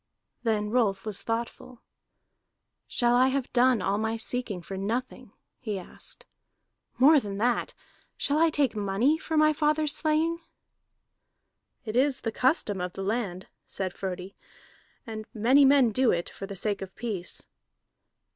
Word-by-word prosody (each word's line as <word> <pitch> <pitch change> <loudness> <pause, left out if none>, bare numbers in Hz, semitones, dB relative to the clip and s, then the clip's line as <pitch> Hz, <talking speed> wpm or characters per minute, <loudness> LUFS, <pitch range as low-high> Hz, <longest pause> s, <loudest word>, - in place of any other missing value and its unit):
Then 215 -3 0
Rolf 215 -5 +1
was 210 -3 -2
thoughtful. 235 +2 -5 1.0
"Shall 240 0 +2
I 255 +1 +5
have 265 -1 -2
done 245 -4 +4
all 200 +2 0
my 220 +1 -1
seeking 225 -5 -2
for 195 - -7
nothing?" 225 +7 -4 0.3
he 215 -5 -3
asked. 190 - -7 0.7
"More 295 +4 +7
than 200 -5 -6
that, 240 +3 0 0.4
shall 290 +1 0
I 330 0 +5
take 285 -6 +1
money 210 +10 +1
for 320 - -2
my 305 0 +5
father's 300 0 +1
slaying?" 320 +2 +1 1.5
"It 215 0 -4
is 270 +1 +2
the 225 - -2
custom 235 - +1
of 180 0 -4
the 195 - -5
land," 195 -3 -2 0.2
said 185 -2 -3
Frodi, 190 0 -5 0.7
"and 220 -2 -7
many 255 +6 +5
men 270 -4 +5
do 255 +3 +2
it 175 0 0
for 195 - -8
the 200 - -7
sake 200 +1 -2
of 190 -1 -8
peace." 205 -7 -5
230 Hz, 145 wpm, -27 LUFS, 200-265 Hz, 1.5 s, More